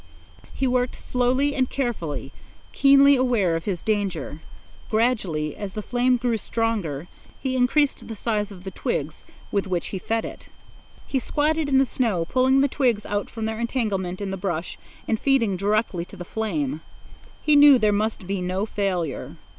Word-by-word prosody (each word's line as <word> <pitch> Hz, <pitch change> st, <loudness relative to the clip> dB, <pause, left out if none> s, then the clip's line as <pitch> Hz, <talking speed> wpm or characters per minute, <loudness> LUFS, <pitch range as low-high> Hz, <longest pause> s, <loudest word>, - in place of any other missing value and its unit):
He 270 Hz, -, -2 dB
worked 250 Hz, -1 st, +1 dB
slowly 255 Hz, +3 st, +1 dB
and 260 Hz, -3 st, 0 dB
carefully, 170 Hz, -, -3 dB, 0.4 s
keenly 280 Hz, 0 st, +6 dB
aware 235 Hz, -10 st, +2 dB
of 165 Hz, -, -4 dB
his 185 Hz, -5 st, -3 dB
danger. 195 Hz, -9 st, -2 dB, 0.5 s
Gradually, 200 Hz, -, 0 dB
as 200 Hz, -2 st, -6 dB
the 215 Hz, -, -4 dB
flame 250 Hz, +2 st, +2 dB
grew 240 Hz, -1 st, 0 dB
stronger, 205 Hz, -11 st, -1 dB, 0.3 s
he 260 Hz, -1 st, -2 dB
increased 265 Hz, +3 st, +2 dB
the 225 Hz, -, -6 dB
size 210 Hz, -1 st, -1 dB
of 185 Hz, -2 st, -11 dB
the 190 Hz, -, -6 dB
twigs 155 Hz, -3 st, -3 dB, 0.3 s
with 200 Hz, -1 st, 0 dB
which 180 Hz, -2 st, -2 dB
he 190 Hz, -, -4 dB
fed 225 Hz, +5 st, -1 dB
it. -, -, -9 dB, 0.6 s
He 270 Hz, -, -1 dB
squatted 300 Hz, +3 st, 0 dB
in 270 Hz, -, +4 dB
the 270 Hz, -, +5 dB
snow, 220 Hz, -10 st, 0 dB
pulling 260 Hz, +6 st, +3 dB
the 280 Hz, -, +4 dB
twigs 245 Hz, -6 st, 0 dB
out 205 Hz, 0 st, -2 dB
from 225 Hz, -1 st, -5 dB
their 220 Hz, 0 st, -3 dB
entanglement 205 Hz, -7 st, -2 dB
in 195 Hz, -1 st, -3 dB
the 195 Hz, -, -3 dB
brush 175 Hz, -3 st, -3 dB, 0.3 s
and 220 Hz, -, 0 dB
feeding 245 Hz, -8 st, +2 dB
directly 200 Hz, -2 st, 0 dB
to -, -, -13 dB
the 175 Hz, -, -7 dB
flame. 160 Hz, -10 st, -2 dB, 0.6 s
He 300 Hz, -, +4 dB
knew 290 Hz, -2 st, +8 dB
there 215 Hz, -3 st, +3 dB
must 210 Hz, -1 st, -1 dB
be 195 Hz, 0 st, -2 dB
no 185 Hz, +3 st, -1 dB
failure. 185 Hz, -9 st, -2 dB
215 Hz, 170 wpm, -24 LUFS, 185-255 Hz, 0.6 s, knew